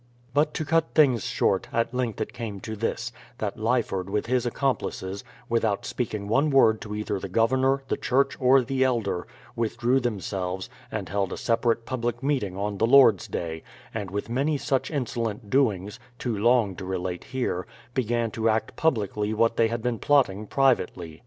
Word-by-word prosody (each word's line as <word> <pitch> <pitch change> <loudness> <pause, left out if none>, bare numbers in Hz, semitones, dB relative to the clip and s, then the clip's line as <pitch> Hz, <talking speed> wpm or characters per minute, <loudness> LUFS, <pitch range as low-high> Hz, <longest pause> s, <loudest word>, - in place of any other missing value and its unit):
But 150 +1 +2
to 155 - -2
cut 165 +1 +1
things 130 - +4
short, - - +1
at 115 +1 0
length 125 -4 -2
it - - -3
came 115 -5 -5
to 110 - -5
this, 115 +3 -2 0.3
that 105 -1 -3
Lyford 110 -5 0
with 105 +1 -1
his 125 0 +1
accomplices, 105 -7 -2 0.2
without 115 -3 0
speaking 105 -4 -3
one 135 +8 +3
word 115 -6 +4
to 105 -1 -5
either 105 -2 -2
the 95 - -6
Governor, 130 +6 +2
the - - -1
Church, 135 +2 +1
or 130 0 +5
the 130 +1 0
elder, 115 -8 0 0.3
withdrew 120 +3 +1
themselves, 95 -5 -3 0.2
and - - -3
held 100 0 -1
a - - -4
separate 115 0 +1
public 120 -1 -3
meeting 125 -10 0
on 100 0 -3
the 115 - +3
Lord's 125 -7 +6
day; 80 -1 -4 0.3
and 105 -4 -4
with 100 +2 -3
many 140 +6 0
such 135 -1 -1
insolent 115 -7 -3
doings, 105 -5 +1 0.2
too 120 -3 -2
long 110 -2 +3
to 95 - -6
relate 90 -1 -3
here, 125 -8 -2 0.3
began 120 -2 0
to 115 +1 0
act 110 0 0
publicly 105 -7 0
what 115 +1 +2
they 115 - +4
had 115 0 -3
been 120 -3 -1
plotting 110 -8 +2
privately. 90 - +1
115 Hz, 175 wpm, -26 LUFS, 100-130 Hz, 0.3 s, Lord's